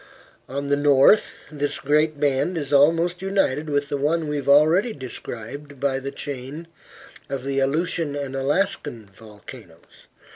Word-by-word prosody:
On 140 +2 -4
the 140 0 +2
north 145 +7 +5 0.2
this 145 -1 -2
great 150 +1 +1
band 145 +5 +1
is 145 -2 -4
almost 165 +5 +3
united 175 -7 0
with 145 -1 -1
the 145 - -1
one 155 +3 0
we 150 0 -2
have 140 -1 -3
already 160 +11 +4
described 130 - -8
by 135 -1 0
the 135 +1 -5
chain 140 +3 -7 0.6
of 135 -2 -4
the 135 0 -1
Aleutian 150 +2 0
and 140 -2 -4
Alaska 145 +4 0 0.3
volcanoes. 105 -2 -14
145 Hz, 145 wpm, -23 LUFS, 135-155 Hz, 0.6 s, north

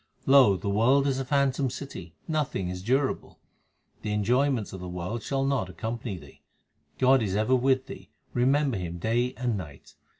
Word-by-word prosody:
Lo! 130 -8 +6
the 90 - -6
world 120 +8 +3
is 135 -1 0
a - - -1
phantom 140 0 +1
city; 95 - -8
nothing 145 - -1
is 90 0 -5
durable. 130 +6 -1 0.6
The 105 -1 -3
enjoyments 120 +2 +1
of 95 - -6
the 90 0 -7
world 90 +6 -4
shall 135 -1 -1
not 135 -9 0
accompany 115 +1 -5
thee. 70 -4 -15 0.6
God 130 0 +4
is 100 -3 -1
ever 110 +5 +2
with 130 +1 +2
thee; - - -10 0.2
remember 135 +1 +2
Him 85 -2 -5
day 120 +7 0
and 125 -3 -1
night. 75 -8 -9
120 Hz, 170 wpm, -27 LUFS, 95-135 Hz, 0.6 s, Lo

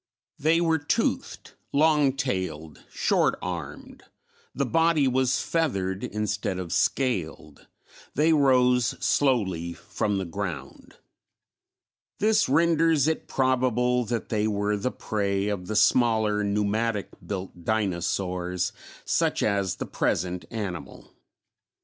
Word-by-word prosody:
They 160 +3 +3
were 165 -1 +2
toothed, 145 - -2 0.2
long 150 -2 +3
tailed, 95 - -4
short - - +1
armed, - - -7 0.5
the 140 - 0
body 165 0 +3
was 130 0 +1
feathered 100 - -1
instead 105 -2 -2
of 90 -3 -4
scaled; 85 - -1 0.5
they 155 +3 +4
rose 125 -4 +3
slowly 95 - +1
from 85 +4 -2
the 95 - -2
ground. 90 -1 -6 1.2
This 215 -3 +2
renders 165 -1 +3
it 160 - -1
probable 125 -1 +1
that 115 +1 -3
they 110 -1 0
were 105 0 0
the 105 +5 -1
prey 100 -1 -1
of 95 -3 -4
the 110 - -3
smaller 110 -1 +3
pneumatic 105 +1 0
built 95 -3 -6
dinosaurs 90 -3 -1 0.3
such - - +1
as 100 -4 0
the - - -5
present 90 +1 -1
animal. 100 -6 -6
110 Hz, 110 wpm, -26 LUFS, 95-135 Hz, 1.2 s, they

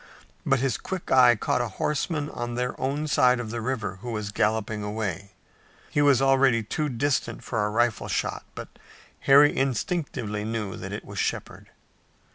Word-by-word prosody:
But 135 - +4
his 130 -2 -1
quick 190 -2 -6
eye 125 -2 +7
caught 115 - 0
a 120 - -1
horseman 150 0 -1
on 120 0 -4
their 125 +1 -1
own 140 +3 -1
side 125 -3 +4
of 115 -3 -5
the 120 0 -3
river 110 -6 -3
who 120 - -6
was 105 -3 -3
galloping 105 +1 0
away. 105 -2 -4 0.6
He 145 - +2
was 140 -3 +4
already 135 -4 +4
too 150 +8 -2
distant 135 +2 -1
for 115 -4 -1
a 105 - 0
rifle 120 +1 +1
shot, - - -2
but - - -7 0.6
Harry 145 +2 +7
instinctively 130 -5 -2
knew 110 -3 -3
that - - -7
it - - -6
was - - -7
Shepard. - - -3
120 Hz, 170 wpm, -26 LUFS, 110-135 Hz, 0.6 s, eye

